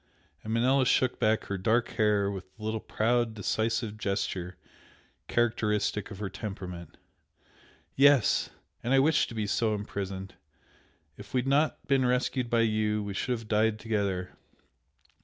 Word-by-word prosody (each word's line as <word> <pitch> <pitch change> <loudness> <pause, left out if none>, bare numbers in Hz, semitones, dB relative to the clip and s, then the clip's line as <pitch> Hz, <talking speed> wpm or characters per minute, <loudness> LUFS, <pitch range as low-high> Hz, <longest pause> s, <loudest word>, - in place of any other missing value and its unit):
and 110 - -5
Manella 130 +3 +3
shook 130 0 +2
back 110 +1 +2
her 100 -1 -4
dark 115 +5 +2
hair 105 -3 +1
with 95 -2 -6
the 110 - -12
little 110 +1 -1
proud, 115 +1 0
decisive 110 +1 -1
gesture 95 -3 -2 0.7
characteristic 105 -3 0
of 100 - -8
her 105 0 -3
temperament 90 -5 -7 1.0
"Yes! 140 -3 +4 0.3
and 125 +3 +1
I - - +6
wish 155 +4 +3
to 115 - -9
be 110 -1 -1
so 110 +1 +1
imprisoned! 95 -2 -5 0.8
If - - -9
we - - +4
had 130 - -6
not 145 +3 +1
been 135 -1 +2
rescued 125 0 0
by 115 -1 +3
you, 110 -1 +1
we 100 -1 -5
should 125 +6 -1
have 110 -1 -11
died 110 0 +2
together! 100 -5 -2
110 Hz, 150 wpm, -29 LUFS, 100-120 Hz, 1.0 s, I